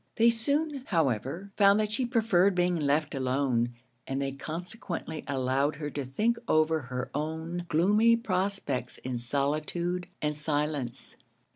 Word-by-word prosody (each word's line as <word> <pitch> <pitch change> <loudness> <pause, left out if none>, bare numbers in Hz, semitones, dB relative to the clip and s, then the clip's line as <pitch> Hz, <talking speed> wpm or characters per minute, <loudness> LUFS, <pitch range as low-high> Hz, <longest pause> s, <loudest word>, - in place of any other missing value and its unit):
They 230 0 +5
soon, 280 +4 0
however, 160 - 0
found 200 0 +5
that 215 -1 0
she 245 +3 0
preferred 200 -6 +3
being 180 0 +2
left 150 -1 +1
alone; 130 -3 0 0.3
and 135 0 -2
they 135 0 -1
consequently 165 - -5
allowed 135 +2 +1
her 150 0 -5
to 140 -1 -3
think 215 - +1
over 155 0 +3
her 125 -2 -5
own 160 +4 -3
gloomy 210 +9 +4
prospects 185 - -2
in 125 -1 -3
solitude 155 +7 -1
and 150 0 -1
silence. 150 -5 -2
155 Hz, 135 wpm, -29 LUFS, 140-200 Hz, 0.3 s, They